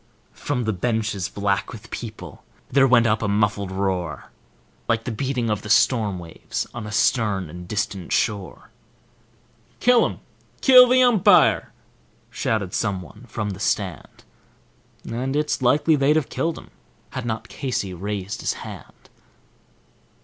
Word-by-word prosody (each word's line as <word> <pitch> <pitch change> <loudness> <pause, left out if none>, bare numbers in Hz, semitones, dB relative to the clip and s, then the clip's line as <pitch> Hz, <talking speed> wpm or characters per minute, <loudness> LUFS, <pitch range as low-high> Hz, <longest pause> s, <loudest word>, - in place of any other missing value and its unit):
From 130 -4 -3
the 110 -1 -1
benches, 110 -1 -1
black 100 -1 -1
with 115 -1 -11
people, 105 - -8 0.3
there 135 0 +5
went 120 -2 +5
up 110 -1 +2
a 110 - 0
muffled 100 -1 0
roar, 95 -6 -3 0.6
Like 115 0 +1
the 125 - -4
beating 130 0 -2
of 105 -1 -1
the 105 - -9
storm 110 -4 +3
waves 85 -2 -5
on 115 -3 -6
a - - -7
stern 105 -5 +1
and 90 +1 -9
distant 100 -4 -3
shore. 105 -4 -2 1.1
"Kill 245 -1 +5
him; - - -8 0.4
kill 255 -2 +8
the 255 0 +5
umpire!" 240 -7 +4 0.6
shouted 105 -5 -2
someone 100 +2 -3
from 105 -2 -3
the 95 - -8
stand; 95 -5 -3 0.8
And 130 +4 -3
it's 150 -2 0
likely 145 +5 +3
they'd 145 +1 +3
have 155 -3 0
killed 165 0 -2
him - - -13 0.4
had 130 - -4
not 110 -1 -3
Casey 115 -8 -3
raised 100 +2 -4
his - - 0
hand. - - -11
110 Hz, 140 wpm, -23 LUFS, 100-125 Hz, 1.1 s, kill